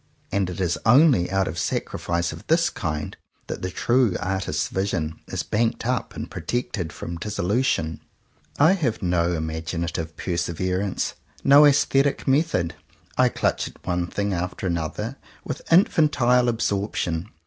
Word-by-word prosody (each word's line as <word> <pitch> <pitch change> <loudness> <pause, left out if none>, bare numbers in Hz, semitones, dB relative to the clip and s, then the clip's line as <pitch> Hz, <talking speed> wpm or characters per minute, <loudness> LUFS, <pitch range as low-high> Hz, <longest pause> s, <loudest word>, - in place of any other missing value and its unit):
And 95 -2 0
it 90 - -6
is 85 -4 0
only 125 - +5
out 95 0 +1
of 80 +1 -4
sacrifice 85 +3 -1
of 80 - -11
this 165 +1 +3
kind 75 -2 -4 0.3
that - - -6
the 90 - -2
true 120 +2 +2
artist's 95 -4 -1
vision 90 -5 -2
is - - -3
banked 115 +1 0
up 125 0 -1
and - - -5
protected 110 -8 -3
from 85 0 -6
dissolution. 90 - 0 0.6
I 160 +5 +6
have 135 - -1
no 90 -1 +1
imaginative 80 0 -3
perseverance, 90 +2 -1 0.3
no 145 +2 +8
aesthetic 140 -1 +2
method. 135 - +2 0.4
I - - +4
clutch - - 0
at - - -15
one 90 -1 -1
thing 100 +2 -2
after 90 +2 -3
another 85 -4 -2 0.3
with - - -6
infantile 145 -8 +4
absorption. 100 -5 -1
95 Hz, 135 wpm, -24 LUFS, 85-120 Hz, 0.6 s, no